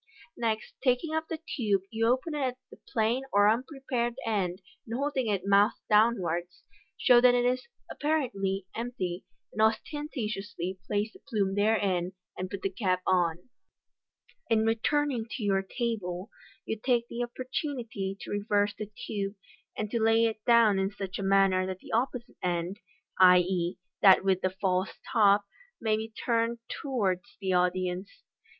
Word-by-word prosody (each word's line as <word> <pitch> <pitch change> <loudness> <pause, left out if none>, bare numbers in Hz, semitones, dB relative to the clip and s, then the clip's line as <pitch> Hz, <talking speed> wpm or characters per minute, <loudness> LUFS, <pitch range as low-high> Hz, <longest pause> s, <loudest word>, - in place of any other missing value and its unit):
Next 225 -2 -2
taking 265 +5 +1
up 320 0 -1
the 325 - -3
tube, 220 - -1
you 225 0 +1
open 260 +6 +1
it 300 - -2
at 255 -2 -1
the - - -14
plain 230 +3 +1
or 205 0 +5
unprepared 245 0 -1
end, 190 -5 -1 0.2
and 230 - -5
holding 275 -2 -1
it 195 -3 -1
mouth 200 +2 +4
downwards, 180 -6 +2 0.3
show 240 -1 +6
that 250 0 +6
it 245 0 +2
is 255 +1 0 0.2
(apparently) 200 -11 -1
empty; 205 -7 -4 0.3
then 215 - +1
ostentatiously 215 - -2
place 210 +1 -1
the - - -15
plume 205 -8 -1
therein, 195 -4 +1 0.2
and 185 0 -4
put 200 0 -6
the 195 - +1
cap 185 -2 0
on. 175 0 +1 1.0
In 220 -1 +3
returning 240 +2 +1
to 235 - -5
your 195 -1 +2
table 195 -3 -3 0.3
you 220 - -3
take 240 -2 +2
the 240 - -5
opportunity 240 -5 -4
to - - -7
reverse 205 0 +1
the 210 0 -7 0.2
tube, 200 -1 -3 0.4
and 215 -1 -3
to 235 - 0
lay 225 +1 +4
it 220 -1 -2
down 230 -4 +5
in 190 0 +1
such 195 -2 -6
a - - -2
manner 195 -1 +3
that 185 -1 -4
the - - -13
opposite 240 +1 -2
end 175 +2 -2 0.4
(i.e., 180 -1 +5 0.2
that 190 -1 +7
with 190 -1 +2
the 185 - +1
false 185 0 -1 0.2
top) 205 -3 +5 0.3
may 220 -1 +1
be 220 +1 -4 0.2
turned 230 -1 +1 0.2
towards 220 -6 -2
the 190 -2 -1
audience. 180 +1 -1
210 Hz, 155 wpm, -29 LUFS, 190-240 Hz, 1.0 s, that